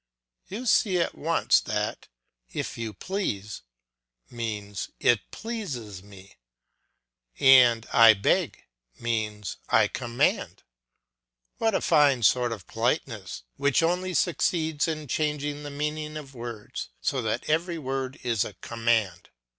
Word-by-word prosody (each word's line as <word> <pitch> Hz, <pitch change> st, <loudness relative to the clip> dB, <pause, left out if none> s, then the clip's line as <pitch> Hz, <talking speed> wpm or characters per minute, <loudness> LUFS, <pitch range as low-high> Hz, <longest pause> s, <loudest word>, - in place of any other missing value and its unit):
You 215 Hz, +7 st, -6 dB
see 200 Hz, -5 st, +3 dB
at 170 Hz, -, 0 dB
once 165 Hz, +2 st, +2 dB
that 105 Hz, 0 st, -3 dB, 0.4 s
"If -, -, -4 dB
you 115 Hz, -1 st, -4 dB
please" 105 Hz, -, -4 dB, 0.7 s
means 105 Hz, -4 st, -4 dB
"It 120 Hz, -4 st, +2 dB
pleases 140 Hz, -, -6 dB
me," 100 Hz, -1 st, -15 dB, 1.0 s
and 125 Hz, -4 st, +6 dB
"I 115 Hz, -2 st, +8 dB
beg" 100 Hz, -, 0 dB, 0.4 s
means 110 Hz, -3 st, -3 dB
"I -, -, +5 dB
command." 120 Hz, 0 st, -1 dB, 1.0 s
What 225 Hz, -3 st, +2 dB
a -, -, +1 dB
fine 140 Hz, -5 st, +4 dB
sort 125 Hz, +1 st, +3 dB
of 105 Hz, -6 st, -6 dB
politeness 115 Hz, -, -2 dB
which 140 Hz, +3 st, +2 dB
only 180 Hz, +2 st, 0 dB
succeeds 160 Hz, -1 st, +1 dB
in 155 Hz, -2 st, -4 dB
changing 150 Hz, 0 st, -2 dB
the 145 Hz, -, -6 dB
meaning 150 Hz, +1 st, -3 dB
of 140 Hz, -3 st, -9 dB
words 120 Hz, 0 st, -7 dB
so 140 Hz, -6 st, -1 dB
that 110 Hz, +1 st, -2 dB
every 170 Hz, +3 st, 0 dB
word 135 Hz, -1 st, -3 dB
is 115 Hz, -4 st, +1 dB
a -, -, -7 dB
command! 115 Hz, -6 st, -1 dB
130 Hz, 125 wpm, -26 LUFS, 110-155 Hz, 1.0 s, I